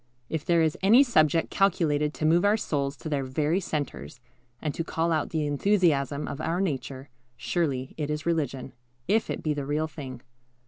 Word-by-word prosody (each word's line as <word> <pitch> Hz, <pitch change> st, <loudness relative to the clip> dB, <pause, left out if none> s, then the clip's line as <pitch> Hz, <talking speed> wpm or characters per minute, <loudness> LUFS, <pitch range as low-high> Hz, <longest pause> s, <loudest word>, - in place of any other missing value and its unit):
If 160 Hz, -2 st, -2 dB
there 170 Hz, -2 st, +3 dB
is 160 Hz, -1 st, +1 dB
any 225 Hz, +8 st, +7 dB
subject 165 Hz, -, +2 dB
calculated 155 Hz, -6 st, +2 dB
to 155 Hz, -, -2 dB
move 170 Hz, +3 st, +4 dB
our 205 Hz, +2 st, +4 dB
souls 140 Hz, -8 st, -2 dB
to -, -, -8 dB
their 145 Hz, -3 st, -1 dB
very 150 Hz, +7 st, 0 dB
centres, 145 Hz, -7 st, -4 dB, 0.4 s
and 150 Hz, -2 st, -3 dB
to 165 Hz, -, -3 dB
call 165 Hz, +1 st, -1 dB
out 155 Hz, -2 st, 0 dB
the 155 Hz, -2 st, -1 dB
enthusiasm 145 Hz, -3 st, +1 dB
of 140 Hz, -, -5 dB
our 165 Hz, +3 st, -1 dB
nature, 140 Hz, -6 st, -3 dB, 0.3 s
surely 140 Hz, -7 st, -1 dB
it 150 Hz, -2 st, -3 dB
is 150 Hz, 0 st, -3 dB
religion, 140 Hz, -6 st, -2 dB, 0.3 s
if 215 Hz, +4 st, +2 dB
it -, -, -4 dB
be 155 Hz, -, +1 dB
the 145 Hz, -1 st, -3 dB
real 150 Hz, +2 st, 0 dB
thing. 135 Hz, -5 st, -8 dB
155 Hz, 185 wpm, -27 LUFS, 145-170 Hz, 0.4 s, any